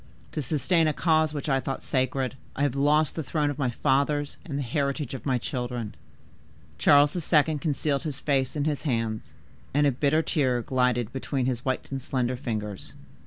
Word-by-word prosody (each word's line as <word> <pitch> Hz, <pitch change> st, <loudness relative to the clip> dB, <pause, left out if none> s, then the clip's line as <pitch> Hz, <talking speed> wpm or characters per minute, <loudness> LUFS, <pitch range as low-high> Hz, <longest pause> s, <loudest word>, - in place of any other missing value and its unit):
To 155 Hz, -, -2 dB
sustain 155 Hz, +4 st, +2 dB
a 155 Hz, -, +2 dB
cause 155 Hz, -1 st, +2 dB
which 150 Hz, -1 st, -4 dB
I 135 Hz, -2 st, +2 dB
thought 135 Hz, +1 st, -4 dB
sacred, 130 Hz, -1 st, 0 dB, 0.2 s
I 140 Hz, -, 0 dB
have 145 Hz, -3 st, +2 dB
lost 150 Hz, +2 st, +3 dB
the 160 Hz, -, -2 dB
throne 150 Hz, 0 st, 0 dB
of 145 Hz, -, -7 dB
my 130 Hz, -3 st, +1 dB
fathers 140 Hz, +4 st, +1 dB
and 140 Hz, -5 st, -4 dB
the 140 Hz, -, -1 dB
heritage 140 Hz, +1 st, -1 dB
of 135 Hz, -, -6 dB
my 130 Hz, -2 st, +2 dB
children.'" 120 Hz, -2 st, -4 dB, 0.9 s
Charles 145 Hz, -, +5 dB
II. 155 Hz, -2 st, +2 dB
concealed 145 Hz, -1 st, 0 dB
his 150 Hz, -4 st, -5 dB
face 135 Hz, -2 st, 0 dB
in 145 Hz, -, 0 dB
his 150 Hz, -1 st, -1 dB
hands, 115 Hz, -6 st, -2 dB, 0.4 s
and 145 Hz, 0 st, +4 dB
a 140 Hz, -, +4 dB
bitter 145 Hz, +5 st, +2 dB
tear 130 Hz, -8 st, +1 dB
glided 125 Hz, -2 st, +1 dB
between 135 Hz, -1 st, -2 dB
his 125 Hz, -1 st, -1 dB
white 130 Hz, 0 st, -2 dB
and 135 Hz, -1 st, -3 dB
slender 125 Hz, -1 st, -1 dB
fingers. 105 Hz, -5 st, -4 dB
140 Hz, 185 wpm, -27 LUFS, 125-150 Hz, 0.9 s, Charles